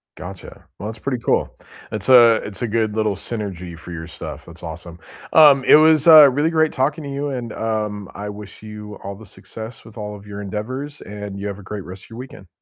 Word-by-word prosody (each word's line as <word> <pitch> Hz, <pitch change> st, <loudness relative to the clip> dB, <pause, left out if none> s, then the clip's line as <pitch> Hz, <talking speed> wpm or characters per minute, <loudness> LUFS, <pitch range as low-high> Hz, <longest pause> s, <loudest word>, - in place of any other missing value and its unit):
Gotcha. 90 Hz, +1 st, -10 dB
Well, 105 Hz, -, -5 dB
that's 110 Hz, -, -7 dB
pretty 130 Hz, -1 st, -2 dB
cool, -, -, 0 dB, 0.4 s
it's 105 Hz, +3 st, -2 dB
a 120 Hz, -3 st, +8 dB
it's 100 Hz, +1 st, -5 dB
a -, -, 0 dB
good 110 Hz, -1 st, 0 dB
little 110 Hz, -2 st, +1 dB
synergy 90 Hz, -6 st, -4 dB
for 85 Hz, +3 st, -10 dB
your 80 Hz, 0 st, -6 dB
stuff, 80 Hz, -, -8 dB
that's -, -, -13 dB
awesome, 85 Hz, +1 st, -8 dB, 0.4 s
um, 145 Hz, -4 st, +7 dB
it -, -, +7 dB
was, 155 Hz, 0 st, +5 dB
uh, 155 Hz, -3 st, +10 dB
really 145 Hz, +5 st, +1 dB
great 160 Hz, -1 st, +2 dB
talking 145 Hz, +4 st, -1 dB
to 140 Hz, -, -6 dB
you, 140 Hz, +1 st, -3 dB
and, 120 Hz, -4 st, -4 dB
um, 105 Hz, -2 st, -3 dB
I 105 Hz, +1 st, -5 dB
wish 105 Hz, +1 st, -10 dB
you 105 Hz, -1 st, -9 dB
all 100 Hz, 0 st, -6 dB
the 110 Hz, +2 st, -13 dB
success 110 Hz, +1 st, -9 dB
with 110 Hz, 0 st, -14 dB
all 105 Hz, -1 st, -5 dB
of 100 Hz, 0 st, -13 dB
your 105 Hz, 0 st, -7 dB
endeavors, 130 Hz, +9 st, -5 dB
and 105 Hz, -1 st, -7 dB
you 100 Hz, -, -5 dB
have 100 Hz, 0 st, -5 dB
a -, -, -12 dB
great 100 Hz, -1 st, -6 dB
rest 90 Hz, +1 st, -9 dB
of -, -, -20 dB
your 115 Hz, -, -9 dB
weekend. 125 Hz, -7 st, -10 dB
105 Hz, 230 wpm, -21 LUFS, 100-130 Hz, 0.4 s, uh